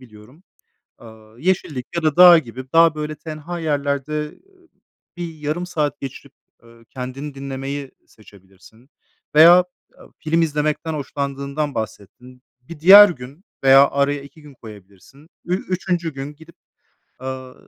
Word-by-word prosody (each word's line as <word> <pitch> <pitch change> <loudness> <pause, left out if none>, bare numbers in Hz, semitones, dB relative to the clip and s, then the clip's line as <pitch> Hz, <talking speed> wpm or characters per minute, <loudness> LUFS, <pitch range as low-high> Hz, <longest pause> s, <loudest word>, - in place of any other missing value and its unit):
biliyorum. 120 +6 -17 0.6
Aaa, 110 -1 -16
yeşillik 155 -6 -2
ya 170 - -2
da 155 -2 +1
dağ 175 -1 +9
gibi, 130 -2 -7
daha, 165 -1 +5
böyle, 155 0 -5
tenha 155 +2 -8
yerlerde, 145 -2 -2
ııı, 360 - -11 0.5
bir 170 -2 -6
yarım 155 +3 -4
saat 155 -5 -3
geçirip, 135 -2 -9 0.3
ııı, 115 0 -20
kendini 130 +4 -8
dinlemeyi 135 0 -6 0.2
seçebilirsin 100 +4 -21 0.5
veya, 160 +3 +9 0.5
aaa, - - -16
film 165 +1 0
izlemekten 155 0 -2
hoşlandığından 140 0 -4
bahsettin. 115 +3 -8 0.2
Bir 150 +5 -12
diğer 200 +5 +9
gün 140 +2 -10 0.2
veya 135 +1 +6
araya 140 0 -1
2 140 +3 -16
gün 150 -1 -15
koyabilirsin. 105 - -16 0.2
Ü 180 - 0
üçüncü 180 -3 -3
gün 135 +2 -7
gidip, 160 +2 -18 0.6
aaa, 130 0 -7
145 Hz, 130 wpm, -20 LUFS, 130-160 Hz, 0.6 s, dağ